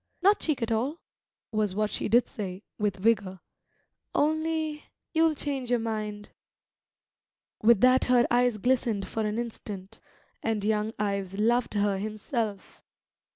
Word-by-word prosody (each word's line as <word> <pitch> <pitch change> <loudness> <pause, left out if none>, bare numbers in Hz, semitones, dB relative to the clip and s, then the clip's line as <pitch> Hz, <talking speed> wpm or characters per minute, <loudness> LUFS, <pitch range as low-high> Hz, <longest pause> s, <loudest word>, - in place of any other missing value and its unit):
"Not 400 +2 +5
cheek 290 -6 0
at 230 - -2
all," 250 +8 0 0.5
was 210 -3 0
what 215 0 0
she - - -1
did 240 +3 +5
say, 190 -1 -6 0.2
with 205 -2 +1
vigour. 195 -2 +1 0.8
"Only 315 0 0 0.3
you'll 320 -1 +3
change 275 -4 -3
your 245 - +3
mind." 215 -2 -4 1.3
With 225 -2 +5
that 255 +1 +5
her 245 -1 +4
eyes 245 -2 +3
glistened 230 -3 +1
for 220 - -2
an 210 +1 -1
instant; 215 -3 -6 0.4
and 220 -2 -1
young 215 0 0
Ives 200 -2 -2
loved 235 +1 +2
her 200 -1 +1
himself. 215 0 -4
220 Hz, 135 wpm, -28 LUFS, 210-250 Hz, 1.3 s, Not